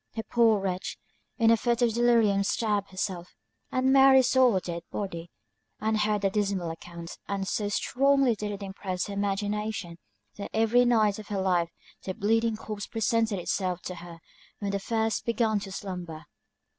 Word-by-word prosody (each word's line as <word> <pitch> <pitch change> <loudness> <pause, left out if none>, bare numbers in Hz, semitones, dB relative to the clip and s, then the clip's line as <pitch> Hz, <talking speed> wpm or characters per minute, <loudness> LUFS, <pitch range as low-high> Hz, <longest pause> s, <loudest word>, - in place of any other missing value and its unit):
The 225 - -3
poor 230 -3 +3
wretch, 185 -1 -3 0.4
in 225 -1 +4
a 230 - +5
fit 240 +1 +1
of 235 -2 +2
delirium 230 -4 +3
stabbed 205 -1 0
herself, 185 -2 -4 0.4
and 260 +1 +2
Mary 270 -1 +7
saw 255 0 +4
her 190 - +2
dead 170 -1 -5
body, 175 -4 -5 0.5
and 220 0 0
heard 210 -1 +1
the 195 - +2
dismal 195 -5 -1
account; 170 0 -9
and 195 -1 -2
so 205 0 -1
strongly 270 +4 +2
did 210 0 -4
it 200 0 -6
impress 190 -2 -4
her 205 - -6
imagination, 205 -2 -2 0.4
that 200 - -6
every 225 +3 +4
night 215 -4 +3
of 215 - -10
her 200 -2 -2
life 180 -3 +1 0.3
the 185 - -5
bleeding 225 +2 +1
corpse 215 -1 -6
presented 225 -1 0
itself 180 0 -2
to 180 - -5
her 170 -1 -10 0.4
when 200 -1 -3
the 200 - -1
first 220 +1 -1
began 225 -2 +1
to 195 -1 -8
slumber. 180 -5 -6
205 Hz, 170 wpm, -27 LUFS, 190-225 Hz, 0.5 s, Mary